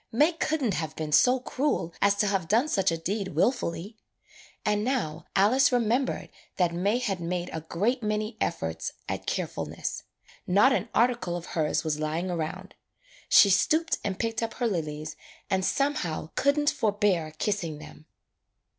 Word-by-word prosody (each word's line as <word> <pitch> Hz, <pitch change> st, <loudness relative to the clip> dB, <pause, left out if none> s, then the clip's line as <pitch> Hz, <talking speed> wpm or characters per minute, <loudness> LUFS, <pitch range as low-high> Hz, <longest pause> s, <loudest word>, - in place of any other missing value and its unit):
May 295 Hz, +9 st, +4 dB
could 315 Hz, -2 st, -1 dB
n't 220 Hz, -6 st, +1 dB
have 160 Hz, -3 st, -3 dB
been 155 Hz, -1 st, -4 dB
so 250 Hz, -, +5 dB
cruel 255 Hz, -, -1 dB
as 200 Hz, 0 st, +4 dB
to 205 Hz, -, +1 dB
have 195 Hz, -4 st, 0 dB
done 230 Hz, -, +3 dB
such 195 Hz, -9 st, +2 dB
a 165 Hz, -, -1 dB
deed 190 Hz, +1 st, -3 dB
wilfully. 205 Hz, -, 0 dB, 0.7 s
And 210 Hz, 0 st, +1 dB
now 240 Hz, -, -2 dB
Alice 245 Hz, +8 st, +5 dB
remem 245 Hz, +1 st, +2 dB
bered -, -, -5 dB, 0.3 s
that 175 Hz, -2 st, +2 dB
May 200 Hz, +7 st, +1 dB
had 210 Hz, -7 st, -2 dB
made 175 Hz, +1 st, -3 dB
a 160 Hz, -, -3 dB
great 210 Hz, +11 st, -1 dB
many 215 Hz, +1 st, -2 dB
efforts 80 Hz, -, -2 dB
at -, -, -4 dB
carefulness. -, -, -3 dB, 0.5 s
Not 205 Hz, +9 st, +5 dB
an 245 Hz, -, -1 dB
article 235 Hz, -7 st, +2 dB
of 175 Hz, -, -8 dB
her's 155 Hz, -2 st, 0 dB
was 155 Hz, -2 st, -1 dB
lying 160 Hz, +4 st, -2 dB
round. 175 Hz, +3 st, -4 dB, 0.6 s
She 200 Hz, -, +7 dB
stooped 320 Hz, -, +2 dB
and 195 Hz, -2 st, -2 dB
picked 225 Hz, 0 st, -2 dB
up 230 Hz, -1 st, -3 dB
her 245 Hz, -, -1 dB
lilies 155 Hz, -7 st, -3 dB, 0.4 s
and 190 Hz, -1 st, +2 dB
somehow 190 Hz, -, -1 dB
could 280 Hz, +1 st, +2 dB
n't 295 Hz, 0 st, +3 dB
forbear 200 Hz, -7 st, 0 dB
kissing 175 Hz, -6 st, -2 dB
them. 155 Hz, 0 st, -13 dB
200 Hz, 165 wpm, -27 LUFS, 165-240 Hz, 0.7 s, She